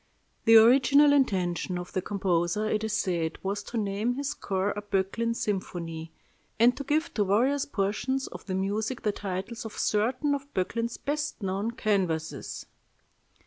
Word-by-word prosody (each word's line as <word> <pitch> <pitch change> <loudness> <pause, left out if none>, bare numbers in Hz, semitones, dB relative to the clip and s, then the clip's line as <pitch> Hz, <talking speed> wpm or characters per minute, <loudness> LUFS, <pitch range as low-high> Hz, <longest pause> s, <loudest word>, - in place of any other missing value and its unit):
The 225 - +7
original 275 +5 +6
intention 185 -9 +1
of 180 0 -7
the 185 - 0
composer, 190 +1 0
it 215 0 0
is 220 -1 -2
said, 170 -6 -1
was 200 +2 -2
to 240 - -5
name 210 +3 -1
his 280 +1 -2
score 195 -7 -1
a 205 - -4
"Böcklin" 205 +4 -1
symphony, 170 -6 -4 0.5
and 240 +2 +5
to 280 - -5
give 305 +4 0
to 210 - +2
various 250 +9 +2
portions 255 +5 -1
of - - -9
the 185 - -2
music 210 +6 -2
the 210 - +2
titles 200 +4 -5
of 220 - -8
certain 255 +7 +1
of 280 0 -4
Böcklin's 230 +5 -1
best 295 -5 -3
known 195 +3 -1
canvases. 195 -9 -2
210 Hz, 155 wpm, -28 LUFS, 190-245 Hz, 0.5 s, The